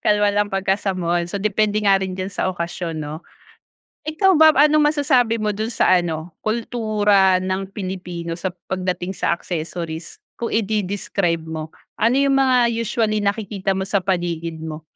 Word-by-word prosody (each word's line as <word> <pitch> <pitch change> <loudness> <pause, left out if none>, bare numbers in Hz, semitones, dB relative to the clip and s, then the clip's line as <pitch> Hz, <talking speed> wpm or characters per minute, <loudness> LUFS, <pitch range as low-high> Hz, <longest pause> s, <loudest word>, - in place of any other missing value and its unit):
Kalma 210 0 +3
lang 205 0 +1
pagka 195 0 +1
sa 200 -2 -1
mall, 175 -1 0
so 190 - -4
depende 210 +1 +1
nga 195 -1 +5
rin 190 -1 -3
diyan 190 +1 -4
sa - - -1
okasyon, 170 -1 -4
'no. 155 +1 -5 0.8
Ikaw 315 +6 +2
ba, 315 0 +8 0.2
anong 300 0 +4
masasabi 260 -6 +2
mo 210 -1 -1
doon 220 +3 -3
sa - - +1
ano, 165 -2 -2
kultura 215 -4 +2
ng 190 +1 -3
Pilipino 180 -4 -5
sa 185 +2 -3
pagdating 185 0 -4
sa - - -1
accessories 165 -1 -4 0.2
kung 235 - -4
ide-describe 200 -5 -1
mo? 160 -1 -6 0.3
Ano 235 +5 +3
'yung 275 0 +3
mga 260 -3 +4
usually 225 -2 0
nakikita 200 -1 -1
mo 190 - -2
sa 200 -1 0
paligid 170 -3 -2
mo? 155 -1 -6
195 Hz, 160 wpm, -21 LUFS, 175-220 Hz, 0.8 s, ba